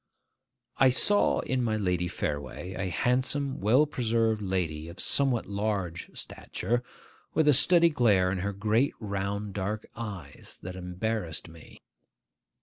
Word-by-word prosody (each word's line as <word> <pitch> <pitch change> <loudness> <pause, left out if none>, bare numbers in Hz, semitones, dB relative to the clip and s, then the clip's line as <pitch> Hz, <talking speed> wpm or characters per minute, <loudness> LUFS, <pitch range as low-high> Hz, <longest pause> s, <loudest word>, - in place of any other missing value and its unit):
I 135 - +7
saw 205 +11 +3
in 130 -1 -1
my 110 -2 0
Lady 90 -3 0
Fareway 75 +3 -4
a 95 0 -3
handsome, 130 +6 0
well 120 +9 +5
preserved 115 -5 0
lady 85 -5 -2
of 85 - -11
somewhat 135 -4 +2
large 100 -4 -3
stature, 120 +6 -3 0.5
with 160 -2 +3
a 150 - +7
steady 170 +5 +6
glare 105 - +3
in 95 - -2
her 100 +3 -1
great 110 +6 +1
round 100 -1 -3
dark 105 +2 -3
eyes 105 -6 -8
that 90 +1 -6
embarrassed 90 -1 -2
me. 80 -1 -15
105 Hz, 135 wpm, -28 LUFS, 90-120 Hz, 0.5 s, I